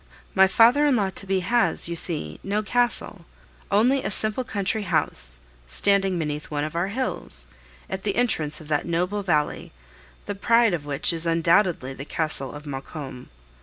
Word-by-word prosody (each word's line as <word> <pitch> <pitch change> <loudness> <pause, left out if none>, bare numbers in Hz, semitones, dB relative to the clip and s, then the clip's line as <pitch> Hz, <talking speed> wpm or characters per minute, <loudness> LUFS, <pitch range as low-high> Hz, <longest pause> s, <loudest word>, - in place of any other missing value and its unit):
My 190 0 +5
father 240 +9 +4
in 280 - +2
law 200 -4 0
to 195 - -4
be 190 -1 0
has, 235 +2 0
you 170 - -4
see, 150 - -4
no 205 +2 -2
castle, 225 -4 0 0.5
only 250 +7 +2
a - - -2
simple 215 +4 +1
country 205 -1 -3
house, 70 - +6 0.3
standing 195 - +1
beneath 150 -2 -4
one 145 -1 -3
of 155 +2 -6
our 170 +2 -1
hills, 255 +6 -3 0.4
at 190 0 -5
the 200 -1 -3
entrance 155 -11 -1
of 155 - -13
that 150 +1 -1
noble 180 +5 -1
valley, 155 -6 -2 0.5
the - - -4
pride 230 +1 +2
of 150 -4 -4
which 145 +4 0
is 165 0 0
undoubtedly 165 -4 +1
the 135 - -9
Castle 150 -3 0
of 145 +1 -11
Maucombe. 135 -2 -8
180 Hz, 170 wpm, -23 LUFS, 150-210 Hz, 0.5 s, house